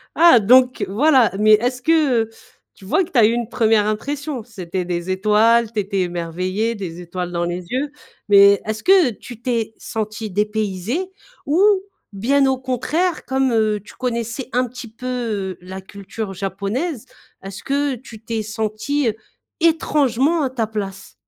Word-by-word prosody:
Ah, 335 -7 +7
donc 250 +4 +4
voilà, 255 +1 +4
mais, 215 0 +6
est-ce 245 +4 +1
que, 295 -5 +3
heu 225 - -10 0.5
tu 195 - -16
vois 380 - +2
que 345 - -9
tu - - -1
as 220 - +7
eu 220 - +4
une 235 -1 -2
1re 220 -3 +2
impression? 280 +4 -3
C'était 185 -5 -5
des 175 0 -3
étoiles, 215 +4 +3
tu 215 - -1
étais 195 -1 -1
émerveillé, 185 +5 -2
des 180 -4 -6
étoiles 175 0 -5
dans 170 0 -1
les 175 +1 -4
yeux. 275 +3 -1 0.4
Mais 200 0 +7
est-ce 220 0 -4
que 370 -8 +5
tu 230 +1 -11
t'es 230 -3 -1
senti 215 0 -4
dépaysé? 210 - -2 0.4
Ou 300 +5 +2 0.5
bien 270 +8 +2
au 265 0 +1
contraire 280 +7 -1
comme, 265 -1 +1
heu, 215 -2 +1
tu - - -15
connaissais 235 0 -3
un 250 +1 +1
petit 245 0 -9
peu, 250 +3 -8
heu, 220 -7 -3
la 190 +1 -8
culture 200 +1 -7
japonaise. 200 - -3 0.4
Est-ce 195 0 -8
que 280 0 0
tu 230 -3 -13
t'es 225 -1 -3
senti 220 +5 -1 0.5
étrangement 305 -2 +2
à 265 - 0
ta 235 -4 -1
place? 200 -3 -6
225 Hz, 165 wpm, -20 LUFS, 200-260 Hz, 0.5 s, Ah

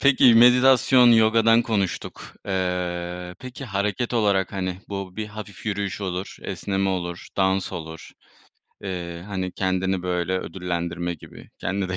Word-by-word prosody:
peki 130 -3 +6
meditasyon, 125 +1 +6
yogadan 115 +1 +5
konuştuk. 105 -6 -2 0.2
Eee, 90 -1 -2
peki, 130 +1 -8
hareket 105 +3 -2
olarak, 100 -4 +2
hani, 95 -2 -3
bu 95 -2 -6
bir 110 -1 -3
hafif 105 -1 -10
yürüyüş 100 -3 -2
olur, 95 0 -4
esneme 95 +1 -2
olur, 90 -2 -3
dans 95 -1 +1
olur, 80 -1 -7 0.7
eee, 85 -3 -5
hani, 95 -3 -3
kendini, 95 0 -1
böyle, 90 0 -1
ödüllendirme 85 -1 -3
gibi 80 - -14
kendini 95 0 -2
de 95 - -2
95 Hz, 130 wpm, -24 LUFS, 90-105 Hz, 0.7 s, peki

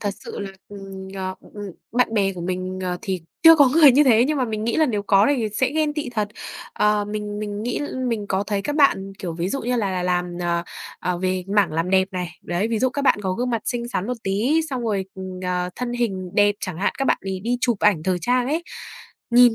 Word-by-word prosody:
thật 205 - -1
sự - - -7
là, 200 -1 -4 0.2
ừm, 195 -1 -9
ờ, 185 -1 -3
ừm, - - -19
ừm, 205 -2 -6 0.2
bạn 245 -1 +2
bè 195 -2 +2
của 180 - -8
mình, 185 +1 -3
ờ, 180 -1 -2
thì 185 -3 -2 0.2
chưa 330 0 +10
có 285 -3 +6
người 295 0 +7
như 290 +4 +5
thế. 240 -2 +5
Nhưng 300 +1 0
mà 255 - +2
mình 215 -2 -3
nghĩ 230 - 0
là 315 -1 +4
nếu 210 -5 -1
có 200 +1 +4
thì 220 -3 -1
sẽ 215 +5 0
ghen 305 -1 0
tị 295 -5 -3
thật. 215 -3 -1 0.4
Ờ, 210 0 +2
mình 210 0 -4
mình 210 0 -4
nghĩ 245 +1 -2 0.3
mình 215 -3 -2
có 190 +1 +1
thấy 200 -2 -1
các 295 +5 -2
bạn, 195 -10 +3
kiểu, 175 -3 -4
ví 170 +3 -2
dụ 275 - -2
như 245 +1 0
là 205 -4 0
là 185 -1 -2
làm, 180 0 +1 0.2
ờ, 170 -1 0 0.4
ờ, 180 -1 -1
về 185 0 -1
mảng 190 -6 +3
làm 165 +3 -1
đẹp 190 0 +3
này. 180 -1 -3
Đấy, 175 +6 -1
ví 230 -1 0
dụ 260 - +3
các 280 +2 -3
bạn 275 - +4
có 190 -1 0
gương 245 +5 -2
mặt 230 -2 -1
xinh 240 -1 -2
xắn 200 -4 -2
một 250 - -2
tí, 230 +12 +1
xong 255 -2 -2
rồi, 205 -4 -1 0.4
ờ, 180 0 -1
thân 245 -1 -3
hình 195 -7 -2
đẹp 205 0 +4
chẳng 185 -4 -5
hạn, 195 - +1
các 270 - 0
bạn - - +2
ấy 190 -1 -4
đi 240 +5 0
chụp 240 -5 +1
ảnh 200 -7 +3
thời 185 +1 0
trang 245 0 +1
ấy. 315 +5 -1 0.7
Nhìn 240 -1 +7
205 Hz, 255 wpm, -22 LUFS, 185-245 Hz, 0.7 s, chưa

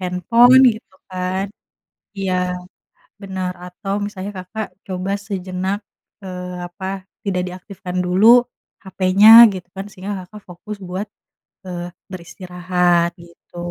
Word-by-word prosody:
handphone, 230 +9 +5
gitu, 215 -4 -17 0.2
kan 185 +1 -2 0.7
iya, 180 -1 -1 0.7
benar, 190 -2 -3 0.2
atau 195 +2 -5
misalnya 205 -1 -6
Kakak 205 +4 -6 0.2
coba 185 +1 -3
sejenak, 190 -1 -3 0.5
eee, 180 -1 -6
apa 190 +1 -6 0.2
tidak 180 -2 0
diaktifkan 185 0 -8
dulu 225 +7 +6 0.4
HP-nya, 190 +3 +4 0.2
gitu, 185 -2 -8
kan, 195 - -4
sehingga 195 +1 -6
Kakak 210 +3 -12
fokus 195 +4 -8
buat, 190 +4 -3 0.6
eee, 175 -1 -5 0.2
beristirahat 180 -1 0
gitu. 170 0 -18
185 Hz, 110 wpm, -19 LUFS, 180-200 Hz, 0.7 s, dulu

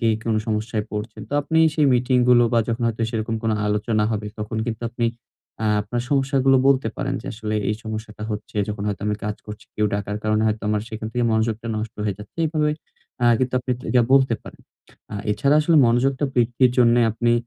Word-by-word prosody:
কে 115 - +2 0.2
কোনো 110 -1 +2
সমস্যায় 110 0 -1
পড়ছেন? 105 0 -5
তো - - -10
আপনি 160 +2 0 0.2
সেই 150 -2 +3
মিটিং 125 +1 +2
গুলো 120 -1 +6
বা 115 - +4
যখন 115 +1 -2
হয়তো 115 0 -3
সেরকম 115 0 -2
কোন 110 - 0 0.2
আলোচনা 105 +1 +1
হবে 105 -1 -2
তখন 105 +1 -4
কিন্তু 115 0 -4
আপনি 120 0 -1 0.6
আ - - +2
আপনার 120 +4 -3
সমস্যাগুলো 135 -1 +3
বলতে 130 -4 +3
পারেন - - -2
যে - - -11
আসলে 110 -1 -4
এই 105 - +1
সমস্যাটা 110 -1 -6
হচ্ছে 105 0 -6
যখন 105 -1 -4
হয়তো 100 -1 -4
আমি 105 - 0
কাজ 105 0 -2
করছি। 105 0 -9
কেউ 105 0 +1
ডাকার 105 0 -3
কারণে 110 0 +2
হয়তো 110 0 -1 0.2
সেখান 110 -1 -6
থেকে 120 -1 0
মনোযোগটা 110 +1 -1
নষ্ট 110 0 -4
হয়ে 105 -2 -1
যাচ্ছে। 105 +9 -13
এভাবে 150 -1 +1 0.5
আ - - +4
কিন্তু 130 0 -1
আপনি 125 0 -5 0.2
এটা 125 -1 +4
বলতে 130 -3 +5
পারেন। - - -12 0.5
আ - - -4 0.2
এছাড়া 140 +7 +2
আসলে 160 +2 +3
মনোযোগটা 130 +4 +2
বৃদ্ধির 120 +1 +3
জন্য 120 -1 +5 0.2
আপনি 120 +1 +1
115 Hz, 200 wpm, -22 LUFS, 105-125 Hz, 0.6 s, গুলো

